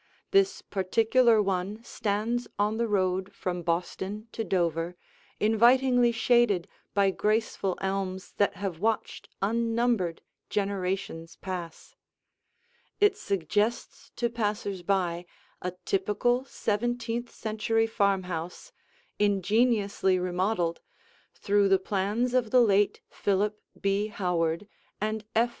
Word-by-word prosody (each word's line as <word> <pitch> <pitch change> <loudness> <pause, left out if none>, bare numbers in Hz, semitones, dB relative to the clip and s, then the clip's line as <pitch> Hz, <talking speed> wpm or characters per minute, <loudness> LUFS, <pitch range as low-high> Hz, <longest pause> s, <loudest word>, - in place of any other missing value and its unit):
This 390 -1 +3
particular 225 +4 +3
one 195 +3 -2
stands 230 +2 -2
on 210 +2 +1
the 235 0 +1
road 190 -1 0
from 180 -1 -3
Boston 185 +5 -3
to 225 - -3
Dover, 170 -3 0 0.4
invitingly 240 +3 +4
shaded 230 -6 +3 0.3
by 200 -1 +4
graceful 210 -2 0
elms 190 -1 -3
that 205 - +2
have 190 -4 -4
watched 220 +3 -2
unnumbered 230 -4 0 0.3
generations 190 -4 -2
pass. 180 -3 -7 1.1
It 410 -1 +5
suggests 205 - -1
to 240 - 0
passers 210 -4 -2
by 175 -2 0 0.3
a 180 0 -3
typical, 240 +6 +1
seventeenth 235 +1 -2
century 225 +1 0
farmhouse, 190 - -1 0.5
ingeniously 205 -1 +2
remodeled, 180 -1 -1 0.5
through 200 -1 +2
the 195 - +6
plans 205 +6 -1
of 250 -3 +2
the 250 +2 +5
late 205 -2 +3
Philip 205 +1 0 0.2
B. 200 +1 +1
Howard 180 -3 -1 0.3
and 215 +1 -2
F. 235 +2 +4
205 Hz, 105 wpm, -28 LUFS, 185-225 Hz, 1.1 s, the